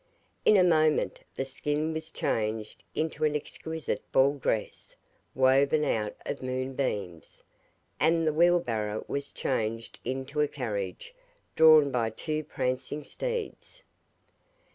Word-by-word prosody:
In 215 - +7
a 185 - +6
moment 155 -3 +3 0.2
the 135 - -2
skin 150 +4 -2
was 160 0 -4
changed 110 -6 -2
into 155 -1 -2
an 150 -1 +2
exquisite 160 +1 -4
ball 135 +2 +4
dress 110 -4 -2 0.4
woven 135 +4 +4
out 105 -7 -1
of - - -4
moon 130 +1 -3
beams, 100 - -4 0.6
and 165 +1 +3
the 155 - +2
wheel 175 +3 +5
barrow 110 -7 -3
was 140 0 -3
changed 115 -2 -2
into 135 +4 -2
a 150 - +3
carriage 105 - -4 0.4
drawn 155 -3 +7
by 120 -3 +1
two 155 +7 -3
prancing 130 +1 -3
steeds. 485 - -5
140 Hz, 125 wpm, -28 LUFS, 120-155 Hz, 0.6 s, In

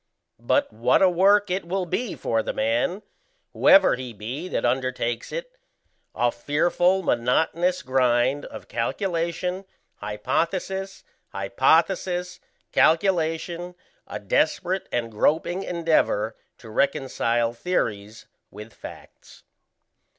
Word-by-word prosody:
But - - +1
what 120 - +3
a 190 - +6
work 200 +2 +4
it 185 +2 -1
will 185 +2 -2
be 230 +6 -3
for 115 -1 -1
the - - -4
man, 120 - 0 0.5
whoever 195 -1 +6
he 125 -2 -5
be 125 - -6
that - - -2
undertakes 125 -2 -1
it - - -5 0.6
a 120 0 +2
fearful 175 +9 +1
monotonous 160 +8 +1
grind 130 +1 +1
of - - -10
calculation, 180 - -2 0.3
hypothesis, 180 - -3 0.3
hypothesis, 175 - +1 0.3
calculation, 170 0 +1 0.3
a - - -5
desperate 190 - 0
and 115 -1 -2
groping 165 - +1
endeavour 160 - 0 0.2
to 110 - -13
reconcile 120 -2 0
theories 110 - -3 0.2
with 105 +2 -11
facts. - - -13
160 Hz, 105 wpm, -24 LUFS, 120-180 Hz, 0.6 s, a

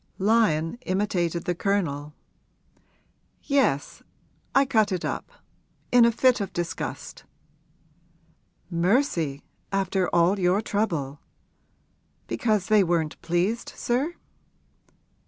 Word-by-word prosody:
Lyon 195 -3 +2
imitated 180 -3 -1
the 175 - 0
Colonel. 160 -6 -2 1.3
'Yes, 265 - 0 0.5
I 275 0 +5
cut 220 -5 +2
it 185 -2 -2
up - - -4 0.6
in 245 -1 +7
a 235 - +4
fit 245 0 +3
of 195 - -3
disgust.' 175 -1 -5 1.5
'Mercy, 170 - +1 0.3
after 195 -1 0
all 175 +4 +3
your 180 +2 +3
trouble! 165 -11 -2 1.1
Because 215 -5 0
they 215 -1 +4
weren't 165 -3 -1
pleased, 175 +7 -1
sir?' 275 +8 -1
190 Hz, 95 wpm, -25 LUFS, 170-220 Hz, 1.5 s, in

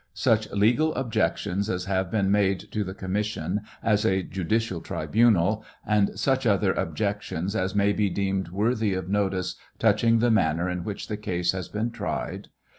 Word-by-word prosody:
Such 110 -1 +2
legal 120 +10 +2
objections 100 -4 -1
as 90 -2 -2
have 95 -2 0
been 100 -1 +1
made 100 -2 +1
to 105 - -1
the 95 0 -6
commission 100 -1 -2 0.2
as 105 -1 +2
a 95 -4 +2
judicial 95 0 -1
tribunal, 110 -2 +2 0.2
and 105 -2 +1
such 130 -2 +1
other 100 -2 +3
objections 100 +1 -2
as 95 -1 -1
may 100 0 +3
be 105 -1 +1
deemed 95 -1 -1
worthy 105 +1 0
of 95 -1 -4
notice 95 -2 0 0.2
touching 115 +1 +3
the 120 +1 +3
manner 85 -4 +2
in 90 -1 -3
which 100 +2 -5
the 105 - -3
case 90 -5 0
has 95 -2 -5
been 110 +3 -2
tried. - - -4
100 Hz, 165 wpm, -26 LUFS, 95-110 Hz, 0.2 s, other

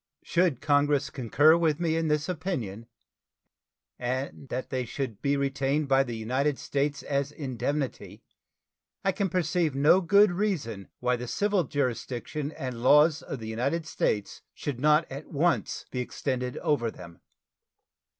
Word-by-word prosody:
Should 170 -7 +1
Congress 145 -1 +2
concur 145 +5 +4
with 160 -2 +1
me 165 -2 +1
in 165 0 0
this 150 0 +1
opinion, 145 - -4 1.1
and 130 +2 -3
that 130 +1 -4
they 130 -1 -1
should 120 -2 -5
be 140 0 +1
retained 140 +1 0
by 135 0 +5
the 120 -4 -3
United 130 +6 0
States 140 0 -2
as 140 0 -1
indemnity, 130 - -4 0.8
I 195 - +4
can 195 0 -1
perceive 175 -4 0
no 150 +7 +5
good 200 +3 +5
reason 170 - -2
why 125 0 +1
the 125 +1 -6
civil 200 - +1
jurisdiction 140 +1 -3
and 125 -4 -5
laws 150 +5 +5
of 140 - -6
the 110 -2 -8
United 140 +9 -1
States 105 -9 -1
should 140 -5 -4
not 150 +3 +4
at 140 +3 -7
once 165 +3 0
be 125 - -3
extended 125 0 -3
over 130 -6 0
them. 85 -5 -12
140 Hz, 145 wpm, -28 LUFS, 125-155 Hz, 1.1 s, by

